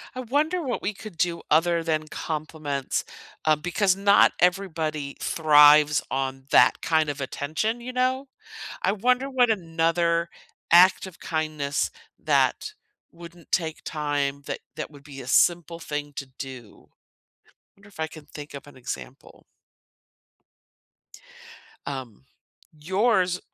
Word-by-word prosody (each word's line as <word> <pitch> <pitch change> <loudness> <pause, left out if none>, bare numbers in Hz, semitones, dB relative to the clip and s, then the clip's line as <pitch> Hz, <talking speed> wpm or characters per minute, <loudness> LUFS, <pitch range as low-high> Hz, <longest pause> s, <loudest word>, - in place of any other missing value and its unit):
I - - -5
wonder 295 +8 0
what 260 -5 -3
we 205 - -1
could 205 -3 -11
do 170 0 0
other 170 +2 +3
than 155 -1 -1
compliments, 150 -3 -3 0.4
um, 155 -1 +3
because 185 +2 +1
not 200 +1 +5
everybody 160 -6 0
thrives 150 -1 +5
on 135 0 -2
that - - +5
kind 160 -2 +1
of 145 0 -4
attention, 155 - -2
you 250 +1 -7
know? 255 +2 0 0.6
I 190 - +2
wonder 250 +6 +1
what 250 -3 +3
another 170 -2 +1 0.4
act 180 +3 +6
of 185 -3 -12
kindness 155 -3 -2 0.3
that 430 - +1 0.4
wouldn't 170 0 -14
take 160 -3 -1
time 145 -2 -2
that - - -4 0.2
that - - -5
would 145 -2 -16
be 140 -2 -10
a 125 - -9
simple 170 +4 +2
thing 150 -2 -5
to 140 - -5
do. 130 -6 -10 0.9
Wonder 200 +1 -19
if 185 - -19
I 160 - -1
can 155 -1 -13
think 150 0 -10
of 140 0 -9
an 145 - -15
example. 130 +1 -9 2.4
Um. 130 - -7 0.6
Yours 185 +1 +1
160 Hz, 130 wpm, -25 LUFS, 145-190 Hz, 2.4 s, act